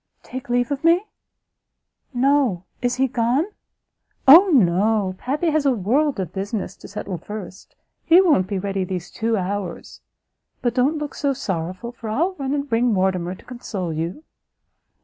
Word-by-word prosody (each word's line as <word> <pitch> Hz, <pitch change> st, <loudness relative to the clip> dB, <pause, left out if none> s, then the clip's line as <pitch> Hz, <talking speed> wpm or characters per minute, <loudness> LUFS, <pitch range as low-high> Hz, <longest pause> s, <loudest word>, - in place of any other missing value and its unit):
"Take 255 Hz, 0 st, -8 dB
leave 245 Hz, +2 st, +1 dB
of 285 Hz, +1 st, -2 dB
me? 340 Hz, +5 st, +4 dB, 1.1 s
No, 260 Hz, -7 st, +2 dB, 0.2 s
is 245 Hz, 0 st, 0 dB
he 265 Hz, +1 st, +2 dB
gone?" 245 Hz, +5 st, +1 dB, 0.8 s
"O 335 Hz, +9 st, +10 dB
no, 205 Hz, -, +3 dB
Pappy 300 Hz, +6 st, -1 dB
has 310 Hz, -1 st, +1 dB
a 275 Hz, -2 st, +3 dB
world 260 Hz, +7 st, +1 dB
of 180 Hz, -2 st, -4 dB
business 195 Hz, 0 st, -4 dB
to -, -, -12 dB
settle 195 Hz, -3 st, -5 dB
first; 195 Hz, 0 st, -9 dB, 0.3 s
he 340 Hz, +2 st, +6 dB
won't 300 Hz, -, +4 dB
be 200 Hz, 0 st, -2 dB
ready 195 Hz, 0 st, -2 dB
these 180 Hz, -1 st, -5 dB
two 225 Hz, 0 st, -1 dB
hours. 190 Hz, -1 st, -4 dB, 0.6 s
But 240 Hz, -2 st, +1 dB
don't 270 Hz, +5 st, +2 dB
look 295 Hz, -1 st, -5 dB
so 280 Hz, -1 st, 0 dB
sorrowful, 185 Hz, -2 st, -4 dB
for 235 Hz, -2 st, -8 dB
I'll 330 Hz, -, 0 dB
run 275 Hz, +1 st, -1 dB
and 285 Hz, 0 st, -2 dB
bring 235 Hz, -1 st, +2 dB
Mortimer 185 Hz, -2 st, 0 dB
to -, -, -18 dB
console 200 Hz, -8 st, -5 dB
you." 170 Hz, -, -4 dB
230 Hz, 160 wpm, -22 LUFS, 190-275 Hz, 1.1 s, O